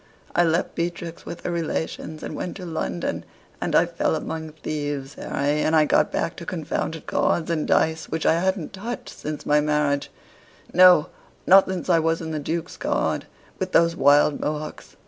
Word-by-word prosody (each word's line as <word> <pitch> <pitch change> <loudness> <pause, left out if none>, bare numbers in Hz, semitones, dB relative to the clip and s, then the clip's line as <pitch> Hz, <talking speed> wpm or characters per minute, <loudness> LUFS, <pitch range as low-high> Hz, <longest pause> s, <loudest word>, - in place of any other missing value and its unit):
I 175 - +5
left 165 +1 +1
Beatrix 170 0 -4
with 170 - -7
her - - -3
relations, 160 -2 -3
and - - -5
went 180 - -5
to 185 - -7
London; 155 - -3 0.4
and - - -1
I - - +6
fell - - -1
among 160 -1 -5
thieves, 145 -3 -4
Harry, 145 +2 -1
and 155 - +2
I 155 -1 +5
got - - +2
back - - -1
to - - -7
confounded - - -3
cards 170 0 0
and 155 -2 -1
dice, 160 0 +1
which 160 - -2
I 165 - +4
hadn't 190 -2 -1
touched 225 +5 -6
since 150 0 -6
my 150 0 +4
marriage 150 -1 0 0.6
no, 180 -4 +7 0.4
not 195 +1 +7
since 185 -2 -4
I 170 -3 +4
was 165 0 +1
in 160 -1 -5
the 155 - -2
Duke's 165 +4 -4
Guard, - - -1 0.3
with 185 0 -3
those 165 0 +4
wild 145 0 +4
Mohocks. 150 0 -5
160 Hz, 180 wpm, -24 LUFS, 150-170 Hz, 0.6 s, no